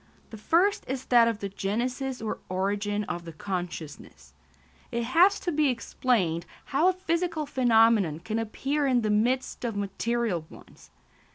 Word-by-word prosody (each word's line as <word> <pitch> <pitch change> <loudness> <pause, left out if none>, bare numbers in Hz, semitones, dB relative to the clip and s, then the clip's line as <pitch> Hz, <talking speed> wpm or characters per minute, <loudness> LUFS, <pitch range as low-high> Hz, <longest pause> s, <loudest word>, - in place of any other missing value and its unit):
The 220 - -8
first 350 - +2
is 260 0 -4
that 235 -2 +5
of 225 -2 -2
the 200 - -2
genesis 245 +6 -3
or 220 - -3
origin 205 +2 -1
of 175 -3 -5
the 170 - -8
consciousness. 175 -2 -6 0.6
It 235 -1 -1
has 345 - +4
to 350 - -1
be 300 -2 +2
explained 225 -8 0 0.2
how 310 +6 +2
a 370 - 0
psychical 335 -2 0
phenomenon 225 - +3
can 220 +4 -2
appear 275 +6 -1
in 250 -2 +3
the 215 -1 0
midst 250 +6 0
of 230 -3 -2
material 205 -1 -1
ones. - - -16
230 Hz, 155 wpm, -27 LUFS, 200-265 Hz, 0.6 s, that